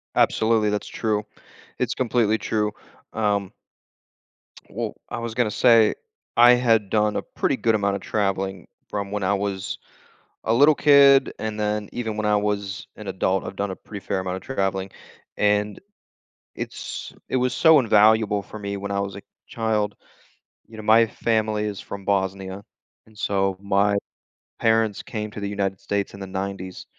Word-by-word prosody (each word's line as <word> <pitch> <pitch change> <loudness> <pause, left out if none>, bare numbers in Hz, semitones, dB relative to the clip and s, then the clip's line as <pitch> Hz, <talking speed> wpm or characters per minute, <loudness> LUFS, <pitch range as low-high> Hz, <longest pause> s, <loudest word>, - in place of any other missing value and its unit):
Absolutely, 110 -1 +3
that's 105 0 -2
true. 105 -2 -1 0.5
It's - - -1
completely 115 -3 +1
true, 105 -1 -1 0.4
um 100 -3 0 1.2
Well, - - -4
I - - -4
was 115 -1 -4
gonna 120 -4 +1
say 115 0 +5 0.4
I 120 +1 +8
had 115 -5 +2
done 105 0 +1
a - - 0
pretty - - -1
good 115 -1 +2
amount 100 -1 +1
of - - -12
traveling 95 -3 -2 0.2
from 100 -1 -4
when 105 -1 -2
I 95 +2 +2
was 100 -1 -3 0.7
a 115 - +2
little 145 +5 +6
kid, 140 -2 +6
and 110 -1 -4
then 105 -1 -1
even 110 -3 -3
when 110 0 -1
I 105 0 +3
was 105 -1 -2
an 105 - -10
adult, 95 0 0
I've 95 - -7
done 100 -1 -2
a 95 - -5
pretty 100 -3 -10
fair 95 - -1
amount 95 0 -3
of 95 - -8
traveling, 95 -6 -2 0.5
and 105 0 +1 0.8
it's - - -6 0.2
it - - -1
was 125 0 +1
so 160 -2 +6
invaluable 110 -3 +4
for 110 - -10
me 100 0 -4
when 100 0 -5
I 100 - 0
was 100 -1 -3
a - - -8 0.3
child. 110 -3 -1 0.7
You 110 - -13
know, 110 - -7
my 115 +2 +5
family 110 -2 0
is 105 -2 -4
from 100 -1 -8
Bosnia, 95 0 -1 0.4
and 110 -1 -20
so 95 -2 0
my 100 0 +2 0.6
parents 110 -2 +2
came 105 -2 -5
to 105 - -7
the 100 -1 -3
United 100 -2 -2
States 100 0 -2
in 100 - -10
the 95 - -6
nineties. 95 -1 -5
105 Hz, 170 wpm, -23 LUFS, 100-110 Hz, 1.2 s, I